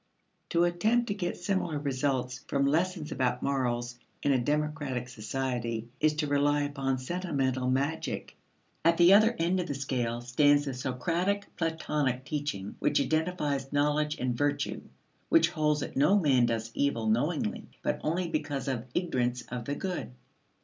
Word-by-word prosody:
To 170 Hz, 0 st, +3 dB
attempt 215 Hz, +8 st, +2 dB
to -, -, +1 dB
get 180 Hz, -3 st, -3 dB
similar 175 Hz, -4 st, -1 dB
results 130 Hz, -2 st, -1 dB
from 140 Hz, 0 st, +1 dB
lessons 165 Hz, +2 st, 0 dB
about 125 Hz, -1 st, 0 dB
morals 120 Hz, -3 st, -1 dB, 0.2 s
in 145 Hz, -, +3 dB
a 130 Hz, -, +3 dB
democratic 145 Hz, -2 st, -1 dB
society 120 Hz, -1 st, -3 dB
is 155 Hz, 0 st, +3 dB
to 150 Hz, 0 st, 0 dB
rely 145 Hz, +1 st, +2 dB
upon 135 Hz, -2 st, -1 dB
sentimental 130 Hz, -4 st, -1 dB
magic. 140 Hz, +5 st, -2 dB, 0.5 s
At 165 Hz, +1 st, +4 dB
the 175 Hz, +2 st, +7 dB
other 220 Hz, +3 st, +6 dB
end 175 Hz, +3 st, +1 dB
of 180 Hz, -, -2 dB
the 140 Hz, -, -3 dB
scale 125 Hz, -4 st, -2 dB
stands 145 Hz, +4 st, +3 dB
the 135 Hz, -, -3 dB
Socratic 170 Hz, +11 st, -1 dB
Platonic 150 Hz, -6 st, -1 dB
teaching 145 Hz, -11 st, -4 dB
which -, -, +2 dB
identifies 150 Hz, -2 st, 0 dB
knowledge 150 Hz, +1 st, +1 dB
and 125 Hz, -1 st, -1 dB
virtue 145 Hz, +2 st, -1 dB, 0.5 s
which 165 Hz, +1 st, +5 dB
holds 150 Hz, -3 st, +1 dB
that -, -, -5 dB
no 165 Hz, +9 st, +5 dB
man 135 Hz, -9 st, +4 dB
does 115 Hz, -1 st, -2 dB
evil 130 Hz, -6 st, 0 dB
knowingly 120 Hz, +2 st, 0 dB, 0.2 s
but -, -, -1 dB
only 175 Hz, +3 st, 0 dB
because 145 Hz, -5 st, -2 dB
of 125 Hz, -3 st, -2 dB
ignorance 125 Hz, -8 st, 0 dB
of 125 Hz, -2 st, -4 dB
the 145 Hz, -, -2 dB
good. 185 Hz, -5 st, -4 dB
145 Hz, 155 wpm, -29 LUFS, 125-165 Hz, 0.5 s, the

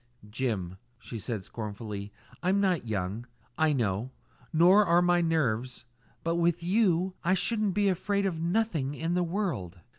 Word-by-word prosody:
"Jim," 105 Hz, -7 st, -2 dB, 0.2 s
she 115 Hz, -2 st, -8 dB
said 110 Hz, -2 st, -4 dB
scornfully, 105 Hz, -1 st, -6 dB, 0.3 s
"I'm 185 Hz, +3 st, +2 dB
not 180 Hz, -10 st, +1 dB
young, 105 Hz, +3 st, -3 dB, 0.3 s
I 160 Hz, -1 st, +3 dB
know, 115 Hz, -3 st, 0 dB, 0.4 s
nor 180 Hz, +5 st, +6 dB
are 175 Hz, -2 st, +4 dB
my 175 Hz, 0 st, +3 dB
nerves; 130 Hz, -7 st, 0 dB, 0.4 s
but 165 Hz, +1 st, 0 dB
with 170 Hz, 0 st, +1 dB
you 185 Hz, -1 st, +2 dB
I 185 Hz, +2 st, +3 dB
should 215 Hz, 0 st, +1 dB
be 205 Hz, +2 st, +1 dB
afraid 200 Hz, +2 st, 0 dB
of 170 Hz, -4 st, -2 dB
nothing 170 Hz, -6 st, 0 dB
in 165 Hz, +3 st, -2 dB
the 180 Hz, -, +2 dB
world!" 165 Hz, -, -2 dB
165 Hz, 150 wpm, -29 LUFS, 115-185 Hz, 0.4 s, nor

